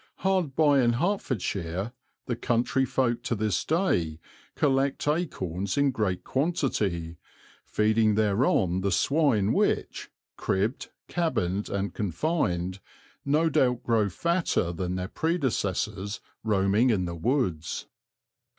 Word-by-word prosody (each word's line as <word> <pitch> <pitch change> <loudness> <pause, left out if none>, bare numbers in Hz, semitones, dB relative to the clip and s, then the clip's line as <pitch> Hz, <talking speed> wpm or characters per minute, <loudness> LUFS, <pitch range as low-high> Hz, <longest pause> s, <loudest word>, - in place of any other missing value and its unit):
Hard 185 -8 +1
by 145 -3 +4
in 120 -1 +3
Hertfordshire 115 - -2 0.3
the 120 - -2
country 120 +3 +1
folk 130 -2 0
to 120 - -1
this 105 -2 0
day 90 - 0 0.4
collect 135 0 +1
acorns 100 - -1
in 140 -1 +3
great 105 -7 -1
quantity, 105 - -1 0.5
feeding 110 0 +2
thereon 100 -4 +2
the 100 +1 0
swine 120 - +2
which, - - 0 0.3
cribbed, 105 +7 -1 0.2
cabined, 105 - -1
and 100 0 -2
confined, 95 - -1 0.4
no 150 +4 +2
doubt 125 -5 +2
grow 110 -4 +2
fatter 170 - 0
than 90 +1 -3
their 90 0 -3
predecessors 105 - -1 0.2
roaming 105 +3 +3
in 100 -6 +1
the 85 - -4
woods. 90 - -1
110 Hz, 115 wpm, -27 LUFS, 95-140 Hz, 0.5 s, by